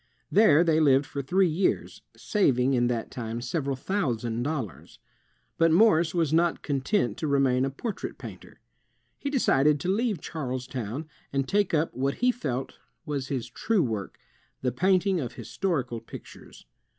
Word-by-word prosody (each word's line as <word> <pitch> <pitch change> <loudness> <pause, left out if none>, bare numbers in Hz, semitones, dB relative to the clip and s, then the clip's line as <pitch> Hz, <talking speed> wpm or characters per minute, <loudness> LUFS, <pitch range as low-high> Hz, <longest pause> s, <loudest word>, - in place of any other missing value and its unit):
There 170 -7 +6
they 160 -2 +3
lived 140 -2 +4
for 140 - -5
three 185 +7 +2
years, 170 +4 -1 0.2
saving 135 - +2
in 120 -1 +2
that 120 -2 -2
time 115 -1 -4
several 135 +3 -2
thousand 120 - -2
dollars. 115 - -4 0.6
But 165 0 +5
Morse 175 -3 +4
was 160 -3 +1
not 170 +1 +2
content 140 - 0
to 155 - -2
remain 135 -2 +2
a - - -1
portrait 200 - -5
painter. - - -11 0.6
He 280 - -3
decided 150 - +3
to 185 +4 +1
leave 220 -4 0
Charlestown, 130 -2 -5 0.2
and 135 -1 -1
take 200 -4 +1
up 160 +1 0
what 135 +2 -1
he 250 +1 +2
felt 135 - -4 0.3
was 140 -4 -3
his 130 -4 -3
true 195 - 0
work, 110 -5 -4 0.5
the 125 - +1
painting 185 - +2
of 125 -6 -4
historical 130 - -2
pictures. 115 - -12
140 Hz, 150 wpm, -27 LUFS, 125-175 Hz, 0.6 s, There